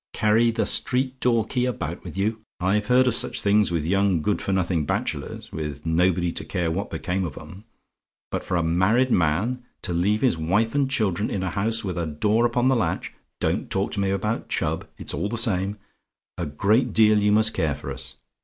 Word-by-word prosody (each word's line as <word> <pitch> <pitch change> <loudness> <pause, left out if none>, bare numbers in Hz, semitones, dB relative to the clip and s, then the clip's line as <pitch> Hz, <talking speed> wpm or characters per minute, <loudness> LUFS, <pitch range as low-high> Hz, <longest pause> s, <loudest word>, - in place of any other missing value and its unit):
Carry 110 +2 +3
the 115 0 0
street 130 0 +2
door 115 -3 +2
key 125 +2 -1
about 125 - -4
with - - -8
you! 110 +3 0 0.2
I've 100 +3 +1
heard 125 +1 +5
of 125 - +2
such - - -1
things 105 +1 +3
with 85 -3 -1
young 95 -2 +2
good 105 - 0
for - - -2
nothing 90 -4 +1
bachelors, - - -3
with 75 -2 -5
nobody 85 +1 +2
to - - -3
care 90 -4 -2
what 95 +5 -3
became 90 +4 -2
of 80 -7 -5
'em; 100 +4 -11 0.7
but - - -2
for 90 - -1
a 85 - +1
married 95 +10 +2
man 95 +10 +1 0.2
to 90 - -2
leave 100 +5 +1
his 120 -11 +2
wife 100 +8 +1
and 140 -2 +1
children 105 - 0
in 95 - -2
a 95 - -2
house 110 +3 -1
with 90 -3 -3
a 85 - -2
door 105 +10 +2
upon 120 +1 +1
the 130 - +4
latch 115 - -1 0.3
don't - - -1
talk 95 +3 -1
to 105 - -3
me 100 -1 +1
about 105 +4 -2
Chubb, - - -1
it's - - -4
all 100 - -2
the 115 - -3
same 100 -3 0 0.6
a 85 - -3
great 105 - +1
deal 110 -1 +5
you 105 0 +2
must 110 +1 +3
care 75 -4 0
for 70 -1 -7
us. 65 0 -5
100 Hz, 210 wpm, -24 LUFS, 85-115 Hz, 0.7 s, heard